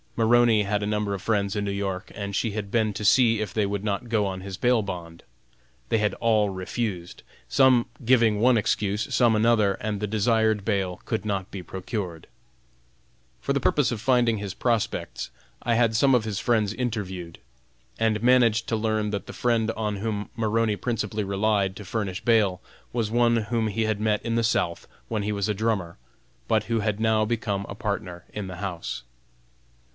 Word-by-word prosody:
Maroney 115 -1 +4
had 105 +1 -1
a - - -1
number 105 -1 -1
of 100 - -4
friends 100 -2 0
in 105 - -1
New 100 - -2
York, 100 0 -3
and 100 -1 -4
she 115 +2 0
had 100 -1 -4
been 110 0 +1
to 105 +2 -5
see 115 0 +5
if 105 -3 -3
they 105 -2 +1
would 100 0 -3
not 105 +3 -2
go 110 -3 +2
on 95 -1 -4
his 95 -1 -6
bail 120 0 +3
bond. 85 -4 -7 0.7
They 115 - +2
had 105 0 0
all 110 -3 +2
refused, 95 -1 -4 0.3
some 130 -3 +4 0.2
giving 115 -3 +4
one 125 +1 +5
excuse, 105 0 -1
some 120 -3 +4
another, 110 -2 +3
and 105 -1 -3
the 105 - -2
desired 110 -1 +1
bail 95 -4 -1
could 110 -2 -2
not 100 -3 -2
be 95 -2 -7
procured. 95 -3 -5 1.1
For - - 0
the - - +1
purpose - - +2
of 110 -3 -4
finding 120 -3 +3
his 100 -2 -5
prospects, 110 - -1 0.3
I 120 -1 +1
had 115 -1 +2
some 135 +4 +4
of 120 -3 +3
his 105 -3 -2
friends 110 -4 +1
interviewed, 100 -8 -4 0.6
and 110 -1 +1
managed 120 -3 +4
to 115 - +1
learn 110 -1 0
that 100 -3 -4
the - - -7
friend 115 -2 +1
on 105 -2 -3
whom 105 0 -3
Maroney 110 -1 +1
principally 110 -2 -2
relied 100 -1 +1
to 105 - -9
furnish 100 -2 -3
bail, 105 -6 +3 0.3
was 115 -3 -1
one 120 0 +3
whom 115 0 0
he 110 +2 -1
had 110 -1 0
met 105 -1 +1
in 115 0 0
the 115 - +2
South 100 -7 0 0.2
when 110 -2 -2
he 105 - -1
was 100 -1 -1
a 105 - +1
drummer, 105 -5 -1 0.5
but 110 -1 +2
who 115 0 0
had 105 -1 -1
now 110 -1 +2
become 105 -3 -2
a 100 - -6
partner 100 -4 -4
in 105 -2 -4
the 90 -1 -7
house. 85 -9 -5
105 Hz, 190 wpm, -25 LUFS, 100-115 Hz, 1.1 s, see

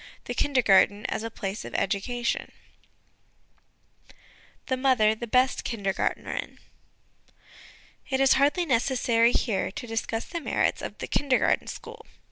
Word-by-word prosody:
THE - - -4
KINDERGARTEN 210 -6 +3
AS - - -2
A 230 - -4
PLACE 200 -2 -5
OF - - -8
EDUCATION 235 +5 -1 2.1
The 260 - 0
Mother 255 -5 +3
the 235 +2 -7
best 255 +3 +2
Kindergartnerin. 200 -5 -3 1.5
It 265 -1 0
is 270 -1 +5
hardly 290 +6 +2
necessary, 240 -3 +2
here, 210 -6 0
to 205 - -7
discuss 225 0 -3
the 340 -1 -5
merits - - 0
of - - -6
the - - -5
Kindergarten 275 -3 +1
School. 455 0 -9
240 Hz, 120 wpm, -26 LUFS, 215-265 Hz, 2.1 s, is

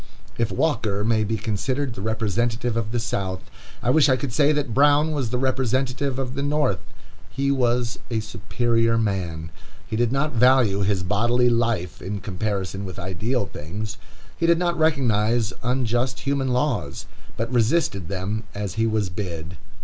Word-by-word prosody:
If 115 -2 0
Walker 105 -10 0
may 110 -1 +3
be 110 +2 -1
considered 125 +5 -2
the 105 - -7
representative 115 +2 0
of 115 -1 -2
the 120 - 0
South, 95 -5 -2 0.4
I 120 - +3
wish 150 +1 +5
I 130 - +5
could 130 -1 -4
say 145 +2 +4
that 145 -6 -1
Brown 145 +3 +4
was 140 -6 -1
the 125 - -1
representative 130 +1 0
of 130 -2 -3
the 140 - -3
North. 145 -8 +1 0.5
He 140 +2 0
was 120 -2 +1
a 115 -2 0
superior 115 +1 0
man. 90 -7 -2 0.3
He 115 -1 -4
did 120 +1 +2
not 140 +3 +1
value 120 -4 +4
his 95 -2 +1
bodily 120 +5 +2
life 115 -7 0
in 100 +2 -4
comparison 100 0 -3
with 95 -1 -7
ideal 100 +6 -1
things. 105 +8 -6 0.4
He 165 - 0
did 170 0 +5
not 175 0 +1
recognize 120 -8 +2
unjust 125 +1 0
human 140 -1 0
laws, 125 - -1 0.3
but 115 +3 -2
resisted 115 - +2
them 100 +4 -3
as 100 -3 -3
he 115 0 +1
was 110 -3 0
bid. 85 -3 -5
115 Hz, 165 wpm, -24 LUFS, 105-130 Hz, 0.5 s, wish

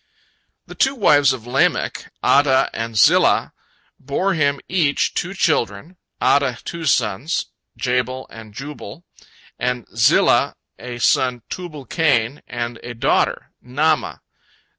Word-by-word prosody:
The - - -11
two 270 +1 +1
wives 145 - +4
of 125 -4 -6
Lamech, 125 +2 0
Adah 140 -2 +4
and 115 -1 -4
Zillah, - - +4 0.5
bore 165 +9 -1
him 145 -4 +1
each 165 -6 +1
two 180 +2 -3
children, 155 - -1 0.2
Adah 140 -3 +2
two 170 -1 -6
sons, 140 - 0 0.3
Jabal 125 +1 -1
and 110 -1 -11
Jubal, 145 +7 -9 0.5
and 125 -1 -2
Zillah 115 -1 +3 0.2
a 120 -1 -7
son, 125 0 +1
Tubal 155 -7 -7
cain, 135 -3 0
and 120 -1 -5
a 120 0 -7
daughter, 115 - 0
Naamah. 150 +5 0
130 Hz, 120 wpm, -20 LUFS, 120-155 Hz, 0.5 s, wives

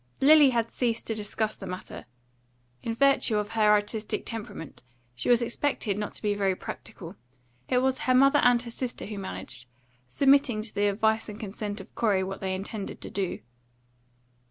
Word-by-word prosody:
Lily 295 0 +7
had 230 -2 0
ceased 230 -2 -1
to 225 - -2
discuss 215 0 -2
the 195 - -7
matter. 185 -8 -7 0.7
In 230 -1 -3
virtue 275 -4 +3
of 210 0 -1
her 220 -2 +3
artistic 210 +1 0
temperament, 220 - -7 0.3
she 125 - -4
was 240 0 +5
expected 235 -4 -1
not 210 +1 -4
to - - -6
be 210 -1 +2
very 195 -2 +1
practical. - - -8 0.5
It 250 0 +2
was 265 0 +1
her 255 - +2
mother 275 +3 +6
and 245 -1 +5
her 235 - -8
sister 245 +1 -4
who 210 -1 -6
managed, 125 -10 -6 0.4
submitting 270 - +3
to 215 - -3
the 205 0 +2
advice 220 +2 +1
and 210 0 -8
consent 210 -1 -5
of - - -15
Corey 200 -5 +1
what 195 +1 -5
they 190 -1 -1
intended 200 +2 -6
to - - -8
do. 195 -2 -2
220 Hz, 180 wpm, -27 LUFS, 205-245 Hz, 0.7 s, Lily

